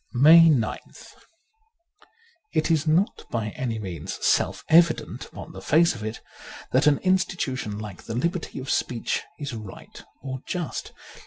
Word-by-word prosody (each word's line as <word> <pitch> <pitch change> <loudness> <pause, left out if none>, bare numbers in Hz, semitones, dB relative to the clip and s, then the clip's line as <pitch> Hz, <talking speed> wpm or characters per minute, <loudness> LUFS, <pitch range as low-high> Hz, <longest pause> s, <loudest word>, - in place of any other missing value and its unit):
'' - - -42
140 160 +6 +8
MAY 120 -8 +3 0.2
9th - - -15 1.4
IT 160 0 +1
is 160 -1 +1
not 170 +7 +1
by 110 -2 -2
any 115 0 -3
means 90 -8 -6
self - - +1
evident 165 0 +3
upon - - -10
the 95 - -10
face 165 - +3
of 115 -3 -8
it 110 +1 -5 0.5
that 130 +3 +3
an 145 -2 +5
institution 175 - 0
like 105 -3 -8
the 115 - -5
liberty 170 +7 -2
of 135 0 -4
speech 120 -2 -1 0.2
is 140 -3 -5
right 110 -4 -10 0.2
or 130 -1 -5
just. 175 -4 -4
135 Hz, 155 wpm, -25 LUFS, 110-165 Hz, 1.4 s, 140